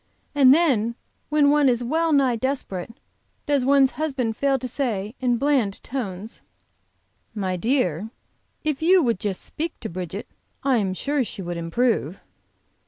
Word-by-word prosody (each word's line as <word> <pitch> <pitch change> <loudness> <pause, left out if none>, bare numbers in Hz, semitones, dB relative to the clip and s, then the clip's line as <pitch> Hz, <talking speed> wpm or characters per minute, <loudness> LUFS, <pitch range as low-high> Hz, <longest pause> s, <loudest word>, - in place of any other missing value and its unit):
And 275 -3 +6
then 260 -8 +3 0.3
when 295 -2 +4
one 295 -2 +4
is 245 -1 +1
well 320 +6 +1
nigh 270 -4 +3
desperate, 230 -7 -3 0.5
does 285 -3 +1
one's 270 0 +4
husband 260 -7 -1
fail 275 +2 +1
to 255 0 -5
say, 225 -6 -2
in 245 -2 +1
bland 260 -7 +1
tones: 215 -5 -5 0.9
"My 190 -3 -1
dear, 215 - 0 0.5
if 305 -2 -1
you 360 +2 +5
would 230 -7 +1
just 200 -3 -3
speak 330 +2 -5
to 220 - -5
Bridget, 185 +3 -6 0.4
I 265 -2 +3
am 190 -4 -1
sure 285 +5 0
she 200 -4 -7
would 175 0 -4
improve." 175 - 0
250 Hz, 150 wpm, -23 LUFS, 205-280 Hz, 0.9 s, And